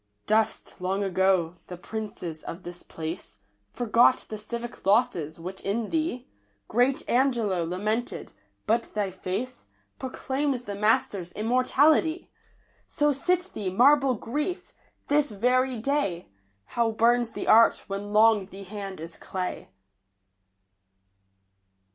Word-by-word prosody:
Dust, 215 -3 0
long 190 +2 0
ago, 185 -2 +1
the 180 - -7
princes 180 -5 -6
of 175 +3 -8
this 175 0 -8
place; 160 +1 -7 0.3
Forgot 240 - +3
the 215 - -5
civic 235 +2 -7
losses 195 -7 +1
which 185 +3 -7
in 210 +2 -2
thee 310 -6 -1 0.4
Great 250 +4 +1
Angelo 235 -8 +2
lamented; 210 +8 -2 0.3
but 230 0 0
thy 205 -2 0
face 195 +8 -5 0.3
Proclaims 265 0 -2
the 205 - -5
master's 200 -3 +1
immortality! 285 +8 +2 0.6
So 295 0 +1
sit 360 +7 0
thee, 200 -3 -3
marble 270 +6 +5
Grief! 295 - -4 0.3
this 295 0 +2
very 250 +4 +1
day 220 -8 -1 0.4
How 230 - 0
burns 235 +1 +3
the - - -5
art 225 +1 +6
when 200 +1 -5
long 215 -2 +5
the 195 0 -10
hand 195 -1 -7
is 165 +1 -9
clay 185 -1 -5
220 Hz, 120 wpm, -27 LUFS, 190-255 Hz, 0.6 s, art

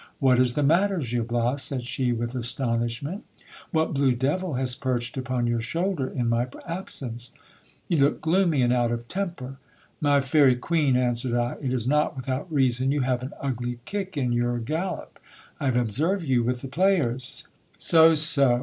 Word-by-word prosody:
What 130 -3 +3
is 125 -1 +2
the 150 - +1
matter, 185 +7 +3
Gil 120 -6 -2
lilas, 120 +3 0
said 130 -2 -2
she 125 0 -1
with 120 +1 -3
astonishment; 120 - -2 0.5
what 160 -2 0
blue 135 -2 +2
devil 150 +6 -1
has 130 -1 +2
perched 120 -2 -2
upon 130 -2 -2
your 120 -1 0
shoulder 165 +3 -1
in 125 -3 -2
my 120 +1 +1 0.2
absence? 125 -9 -5 0.5
You 170 - +1
look 140 +2 +3
gloomy 165 -4 +2
and 120 0 +3
out 120 -1 +1
of 120 0 -4
temper. 170 -9 -4 0.4
My 145 -1 +3
fairy 135 -1 +4
cueen, 145 +1 +1
answered 120 -1 0
I, 120 0 -1
it 135 -3 -2
is 125 -3 -1
not 150 +2 +1
without 130 +5 -4
reason, 130 -2 +2
you 145 0 0
have 125 -1 0
an 130 +3 -6
ugly 125 -3 -3
kick 195 -4 -4
in 125 -3 0
your 120 0 0
gal 160 +11 -2
lop. - - -26 0.4
I - - -3
have 130 -2 +1
observed 155 - 0
you 130 -4 +2
with 125 +1 -1
the 135 - -6
players 140 -6 0 0.3
So, 160 0 +6
so 140 -5 +4
130 Hz, 180 wpm, -25 LUFS, 120-155 Hz, 0.5 s, So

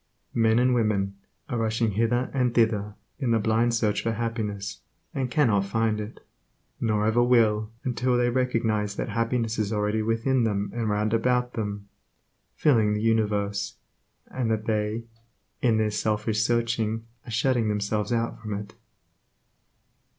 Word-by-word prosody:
Men 115 -1 +3
and 125 +1 +4
women 100 -4 0 0.3
are 120 -4 -2
rushing 115 0 +1
hither 115 +4 0
and 125 -3 +1
thither 105 -3 +2 0.2
in 130 -5 -1
the 115 - +4
blind 115 +2 +2
search 105 -2 +1
for 115 - -1
happiness, 110 -3 -3 0.3
and 130 -2 -1
cannot 115 -9 +2
find 110 +1 0
it; 105 +2 -9 0.5
nor 105 -2 +1
ever 110 +2 +3
will 110 -3 +3
until 125 0 +1
they 120 0 +2
recognize 115 -5 0
that 120 - -3
happiness 115 +1 -1
is 105 -1 0
already 105 0 0
within 115 +4 +1
them 100 -2 -1
and 115 -2 -1
round 105 +1 0
about 125 +2 +1
them, 105 -2 -4 0.7
filling 110 -8 +3
the 105 - -2
universe, 105 -3 0 0.5
and 125 -3 -3
that 110 -1 -1
they, 110 +1 -1 0.6
in 115 -3 +3
their 110 -1 +1
selfish 110 +1 0
searching 115 -1 0 0.2
are - - -7
shutting 120 0 +1
themselves 105 +1 -1
out 115 -1 -1
from 105 -2 -4
it. 100 0 -7
110 Hz, 150 wpm, -26 LUFS, 105-120 Hz, 0.7 s, and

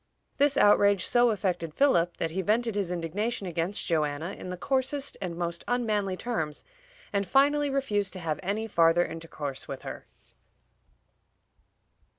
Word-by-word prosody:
This 285 0 +3
outrage 200 -2 +5
so 240 0 +4
affected 180 -7 -2
Philip 175 -12 +3
that 165 - -2
he 190 +3 -1
vented 225 +4 +1
his 195 -3 -1
indignation 195 +7 -2
against 175 +3 -2
Joanna 155 +1 -1
in - - -8
the 180 - -5
coarsest 270 +5 -1
and 180 -3 -3
most 170 -1 -3
unmanly 210 -6 0
terms, 160 -12 -3 0.5
and 200 0 +2
finally 285 +7 +3
refused 210 -8 0
to 185 - -5
have 155 -4 -2
any 205 +4 -2
farther 170 -4 +4
intercourse 150 -4 -6
with 135 -1 -7
her. - - -8
195 Hz, 145 wpm, -28 LUFS, 170-235 Hz, 0.5 s, outrage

